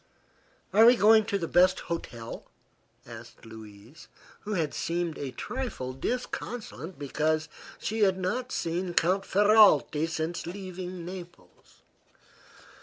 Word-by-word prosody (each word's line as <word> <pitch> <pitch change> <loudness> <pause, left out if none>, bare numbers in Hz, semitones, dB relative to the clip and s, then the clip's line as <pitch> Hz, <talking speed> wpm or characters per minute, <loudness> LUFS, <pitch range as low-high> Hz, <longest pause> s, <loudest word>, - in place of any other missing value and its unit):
"Are 215 +3 +6
we 245 - +8
going 220 -1 +5
to 200 -2 -1
the 170 -4 -3
best 180 +2 +4
hotel?" 120 -9 -6 0.6
asked 115 0 -12
Louise, 110 +5 -13 0.3
who 210 - -5
had 160 -6 -1
seemed 170 -1 -2
a 140 - -4
trifle 130 - -5
disconsolate 230 - -5
because 155 +2 -1 0.3
she 220 +2 -3
had 190 -3 +3
not 240 +8 -2
seen 175 +1 -2
Count 185 +4 +2
Ferralti 205 -6 +4
since 165 +1 -3
leaving 185 -1 -7
Naples. 175 -1 -12
175 Hz, 115 wpm, -28 LUFS, 155-200 Hz, 0.6 s, we